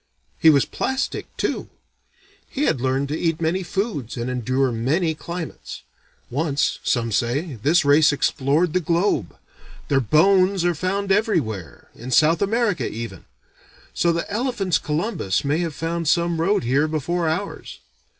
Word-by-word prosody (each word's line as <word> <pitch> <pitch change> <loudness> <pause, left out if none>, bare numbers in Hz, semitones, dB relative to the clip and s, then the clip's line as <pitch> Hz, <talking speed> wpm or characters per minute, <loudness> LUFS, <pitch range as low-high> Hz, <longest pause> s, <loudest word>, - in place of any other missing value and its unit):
He 160 - +6
was 140 -4 +4
plastic, 265 +1 -3
too. - - -2 0.8
He 280 - -2
had 130 - +1
learned 135 +2 0
to 150 - -1
eat 165 -2 0
many 170 +3 0
foods 175 - -3
and 120 +2 -3
endure 130 +2 0
many 150 +9 0
climates. 170 +1 -7 0.5
Once, 145 +1 0
some 115 -2 0
say, 135 - -1
this 155 +5 +3
race 150 +2 +5
explored 145 +4 +1
the 185 - +3
globe. 170 - 0 0.5
Their 140 - +3
bones 185 - +3
are 175 - +3
found 195 +4 -2
everywhere, 150 - -1
in 120 +3 -9
South 160 +5 +4
America 200 - 0
even; 115 +1 -7 0.7
so 170 - +2
the 170 0 -2
elephants' 205 - 0
Columbus 150 - -1
may 145 +3 +1
have 165 -4 -3
found 165 0 -3
some 170 +1 +2
road 195 +1 +2
here 135 +6 +2
before 160 +2 -1
ours. 190 +6 -4
160 Hz, 145 wpm, -22 LUFS, 135-180 Hz, 0.8 s, He